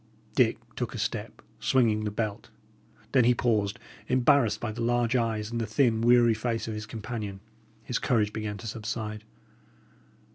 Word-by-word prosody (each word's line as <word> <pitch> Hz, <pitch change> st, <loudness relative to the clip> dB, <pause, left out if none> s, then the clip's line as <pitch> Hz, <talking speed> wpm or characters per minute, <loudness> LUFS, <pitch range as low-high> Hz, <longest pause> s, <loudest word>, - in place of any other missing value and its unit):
Dick -, -, +3 dB, 0.2 s
took -, -, -3 dB
a -, -, -4 dB
step, -, -, -4 dB, 0.2 s
swinging 110 Hz, -4 st, +2 dB
the -, -, 0 dB
belt. 105 Hz, 0 st, -3 dB, 0.6 s
Then 130 Hz, -, +5 dB
he 120 Hz, +1 st, +4 dB
paused, 110 Hz, -3 st, +1 dB, 0.3 s
embarrassed 130 Hz, -2 st, +3 dB
by 120 Hz, -, -3 dB
the 115 Hz, +2 st, -6 dB
large 120 Hz, +1 st, +1 dB
eyes 110 Hz, -2 st, 0 dB
and 115 Hz, 0 st, -2 dB
the 110 Hz, -, -2 dB
thin, 115 Hz, 0 st, +2 dB
weary 120 Hz, 0 st, +5 dB
face 115 Hz, 0 st, -2 dB
of 110 Hz, -, -3 dB
his 105 Hz, 0 st, -6 dB
companion. 110 Hz, -3 st, -5 dB, 0.4 s
His 125 Hz, -, -2 dB
courage 105 Hz, -4 st, +1 dB
began 105 Hz, -2 st, -4 dB
to 115 Hz, -, -10 dB
subside. 110 Hz, -1 st, -4 dB
115 Hz, 160 wpm, -28 LUFS, 105-120 Hz, 0.6 s, Then